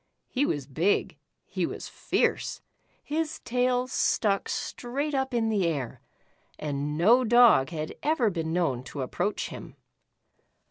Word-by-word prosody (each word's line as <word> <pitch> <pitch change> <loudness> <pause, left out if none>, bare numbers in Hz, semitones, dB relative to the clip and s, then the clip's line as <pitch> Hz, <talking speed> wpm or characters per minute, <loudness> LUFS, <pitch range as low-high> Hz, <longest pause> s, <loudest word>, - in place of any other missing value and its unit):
He 280 +3 +1
was 145 -3 -2
big, 160 +9 0 0.3
he - - -2
was - - -6
fierce, - - -1 0.4
his 315 +1 -2
tail 250 +1 +1
stuck 205 -5 +1
straight 280 +5 -3
up 265 -1 0
in 230 -2 +1
the 200 -5 +1
air, 140 -7 -3 0.6
and 150 0 -3
no 230 +10 +5
dog 240 - +6
had 155 -2 -4
ever 280 -8 +2
been 165 -2 -3
known 160 -8 0
to 140 -1 -5
ap 125 - -7
proach 210 - -1
him. - - -9
210 Hz, 140 wpm, -27 LUFS, 155-250 Hz, 0.6 s, dog